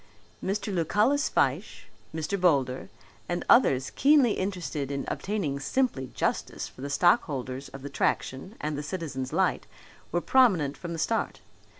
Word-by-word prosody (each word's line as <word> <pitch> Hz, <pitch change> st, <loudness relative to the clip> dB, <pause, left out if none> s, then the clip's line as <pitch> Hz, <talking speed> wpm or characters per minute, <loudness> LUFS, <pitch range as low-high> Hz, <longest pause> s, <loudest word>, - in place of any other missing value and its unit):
Mr. 205 Hz, +1 st, -2 dB
Lucullus 210 Hz, -, +2 dB
Fyshe, -, -, 0 dB, 0.3 s
Mr. 160 Hz, +5 st, -3 dB
Boulder, 135 Hz, -7 st, +2 dB, 0.4 s
and 175 Hz, -, -2 dB
others 135 Hz, -, +4 dB
keenly 280 Hz, -4 st, +5 dB
interested 180 Hz, -8 st, -3 dB
in 140 Hz, -1 st, -3 dB
obtaining 190 Hz, -9 st, -2 dB
simply 145 Hz, -, 0 dB
justice -, -, -2 dB
for -, -, -14 dB
the 140 Hz, -, -4 dB
stockholders 140 Hz, -, +1 dB
of 135 Hz, -1 st, -10 dB
the 140 Hz, -, -5 dB
Traction 135 Hz, -, -1 dB
and 150 Hz, 0 st, -2 dB
the 145 Hz, -, -3 dB
Citizens' 150 Hz, -5 st, -4 dB
Light -, -, +1 dB, 0.4 s
were 175 Hz, -, +1 dB
prominent 180 Hz, -, +3 dB
from 170 Hz, +3 st, -6 dB
the -, -, -4 dB
start. 225 Hz, +8 st, -1 dB
165 Hz, 140 wpm, -27 LUFS, 140-205 Hz, 0.4 s, keenly